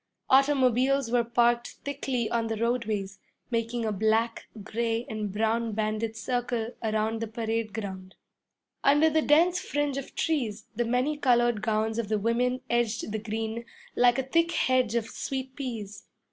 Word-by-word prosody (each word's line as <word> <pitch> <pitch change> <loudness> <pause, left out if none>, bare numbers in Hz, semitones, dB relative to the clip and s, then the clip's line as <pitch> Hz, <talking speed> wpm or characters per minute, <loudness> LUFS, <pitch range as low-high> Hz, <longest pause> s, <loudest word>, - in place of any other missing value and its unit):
Automobiles 265 -2 +3
were 240 -1 +3
parked 235 +1 +2
thickly 265 -4 -2
on 230 -1 0
the 225 -1 -2
roadways, 215 -4 -1 0.3
making 230 0 -1
a 215 - 0
black, 220 +3 +1 0.2
gray, 230 +2 -1
and 215 -2 -3
brown 225 +2 0
banded 215 +1 -2
circle 240 -2 -1
around 220 0 0
the 230 - -2
parade 225 0 -2
ground. 190 -3 -6 0.7
Under 295 +3 +5
the 315 +1 +3
dense 340 +5 +4
fringe 290 -1 -1
of 275 - -10
trees, 235 -10 -1
the 240 - 0
many 250 +6 +1
colored 240 -5 +3
gowns 220 +1 0
of 220 -3 -3
the 215 - +2
women 245 +4 0
edged 235 -2 0
the 220 - -2
green 220 +1 -3 0.3
like 245 0 +4
a 265 - 0
thick 335 +6 +1
hedge 255 -3 +2
of 235 -2 +1
sweet 265 +2 -5
peas. 230 -7 -6
235 Hz, 155 wpm, -28 LUFS, 220-255 Hz, 0.7 s, Under